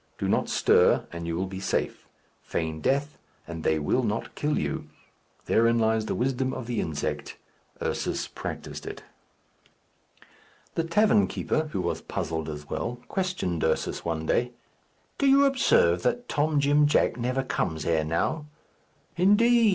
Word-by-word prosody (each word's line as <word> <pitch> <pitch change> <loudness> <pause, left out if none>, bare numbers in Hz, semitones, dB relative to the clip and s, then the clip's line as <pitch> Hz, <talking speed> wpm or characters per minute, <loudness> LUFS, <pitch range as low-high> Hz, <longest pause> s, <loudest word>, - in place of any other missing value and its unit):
Do - - -2
not - - +1
stir, - - +4
and 85 0 -6
you 85 - -2
will 95 - 0
be 95 0 -6
safe. 95 - -2 0.3
Feign 80 -1 -3
death, 140 - 0 0.3
and 80 -1 -6
they 80 - +2
will 80 - +1
not 110 -2 -2
kill 150 0 -1
you. 70 -1 -3 0.6
Therein 115 +1 +3
lies 110 -1 +1
the - - -1
wisdom 130 +1 0
of 125 - -5
the 120 -1 -1
insect. 75 -2 -3 0.5
Ursus - - -2
practised - - -7
it. - - -7 1.7
The 165 - -1
tavern 210 +4 +4
keeper, 155 0 -1
who 95 - -1
was - - -2
puzzled 80 -1 -3
as 75 -1 -7
well, 120 +9 -3
questioned 180 - -1
Ursus 80 - 0
one 80 -1 -2
day. 120 +8 +1 0.7
"Do 280 - +3
you 275 +1 +6
observe 90 - +3
that 245 - -1
Tom 150 0 +1
Jim 145 +1 +4
Jack 150 - +2
never 125 +2 -1
comes 80 - -2
here 80 -2 +1
now!" 85 - -1 0.7
"Indeed!" 225 +5 +5
120 Hz, 150 wpm, -27 LUFS, -, 1.7 s, you